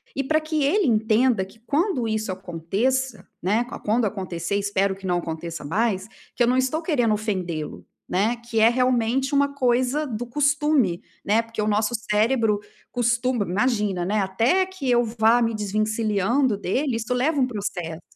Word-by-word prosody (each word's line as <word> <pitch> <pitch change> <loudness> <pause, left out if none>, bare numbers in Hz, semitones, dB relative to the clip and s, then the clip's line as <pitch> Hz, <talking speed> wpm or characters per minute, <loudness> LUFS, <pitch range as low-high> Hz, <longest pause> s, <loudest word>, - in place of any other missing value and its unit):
E 275 - 0
pra 310 +3 +2
que 310 -1 -1
ele 365 +6 +2
entenda 220 -1 +2
que 195 +4 -18
quando 285 - 0
isso 220 -2 -1
aconteça, 195 +8 -2
né, 210 +7 +1
qua 245 - -8
quando 225 +2 +1
acontecer 185 -3 -3
espero 200 -1 0
que 195 0 -11
não 180 -1 +1
aconteça 165 0 -5
mais 195 +4 0 0.3
que - - -4
eu - - +3
não 250 +1 +2
tô 315 +4 -2
querendo 250 -10 +1
ofendê-lo, 185 -7 -3 0.2
né. 215 +6 +1
Que 235 -1 -3
é 220 +1 +7
realmente 250 +2 +1
uma 280 0 +2
coisa 260 +2 +1
do 240 -1 -4
costume, 285 - +1 0.2
né. 215 +3 +3
Porque 230 -1 -5
o 210 - 0
nosso 215 +2 +1 0.2
cérebro 215 0 +2 0.3
costuma 240 -1 +1
imagina, 205 -2 0
né, 210 +3 0
até, 230 - +2
que 375 -8 -5
eu 240 0 +4
vá 225 +1 +3
me 230 -1 +1
desvencilhando 215 +3 0
dele, 250 +7 -1
isso 230 +2 -2
leva 280 +5 +1
um 255 - +3
processo. 180 -7 -5
225 Hz, 170 wpm, -24 LUFS, 200-255 Hz, 0.3 s, é